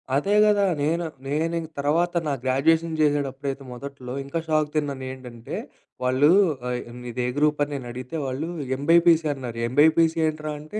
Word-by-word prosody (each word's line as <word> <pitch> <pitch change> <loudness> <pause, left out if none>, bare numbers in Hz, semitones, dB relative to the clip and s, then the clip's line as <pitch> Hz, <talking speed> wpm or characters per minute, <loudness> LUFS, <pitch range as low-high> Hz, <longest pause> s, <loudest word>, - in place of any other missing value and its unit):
అదే 195 +9 +2
కదా! 205 -1 +4 0.2
నేన, 165 +4 +1 0.3
నేను 160 +4 -1
ఇంకా 160 -1 -8
తర్వాత 165 +5 +1 0.2
నా 145 - 0
గ్రాడ్యుయేషన్ 160 +5 +2
చేసేటప్పుడైతే 140 -2 -1
మొదట్లో 130 0 -8
ఇంకా 140 +4 -3
షాక్ 155 -1 +1
తిన్నాను. 140 -3 -1
ఏంటంటే, 125 -3 -8 0.5
వాళ్ళు 130 +4 +4 0.4
ఆహ్, 125 0 -1 0.2
మీదే 125 0 -3
గ్రూప్ 150 0 +2
అని 145 - -4
నేను 130 -3 -6
అడిగితే 125 +5 -7
వాళ్ళు 135 +6 -3 0.3
ఎంబైపీసీ 165 +2 +4
అన్నారు. 125 -4 -7
ఎంబీఐపీసీ 160 +5 +4
ఏంట్రా 155 0 -3
అంటే, 155 +9 -6
145 Hz, 150 wpm, -24 LUFS, 130-160 Hz, 0.5 s, కదా